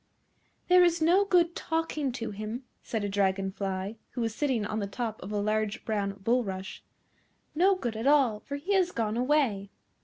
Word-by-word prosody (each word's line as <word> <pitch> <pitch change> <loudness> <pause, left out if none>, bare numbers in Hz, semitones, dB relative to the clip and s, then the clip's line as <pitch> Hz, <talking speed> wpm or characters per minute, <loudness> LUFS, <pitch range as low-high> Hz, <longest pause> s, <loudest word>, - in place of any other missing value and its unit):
"There 360 0 +7
is 345 -1 +3
no 350 +5 +4
good 345 -3 +3
talking 320 -4 -1
to 230 -3 -4
him," 215 +5 -5 0.2
said 225 -3 -3
a - - 0
dragon 195 -1 0
fly, 195 +2 -4 0.2
who 245 - -3
was 225 -1 -1
sitting 250 -4 0
on 215 +1 -2
the 200 - -2
top 220 +1 -4
of 195 - -7
a 210 - -1
large 215 +2 -1
brown 205 -3 -1
bulrush; 200 -5 -1 0.7
"no 375 +5 +4
good 240 -11 -3
at 225 +4 -2
all, 270 -7 +4
for 280 - -6
he 330 +8 -2
has 370 -2 +3
gone 220 -5 -1
away." 245 -6 +1
230 Hz, 185 wpm, -29 LUFS, 205-300 Hz, 0.7 s, There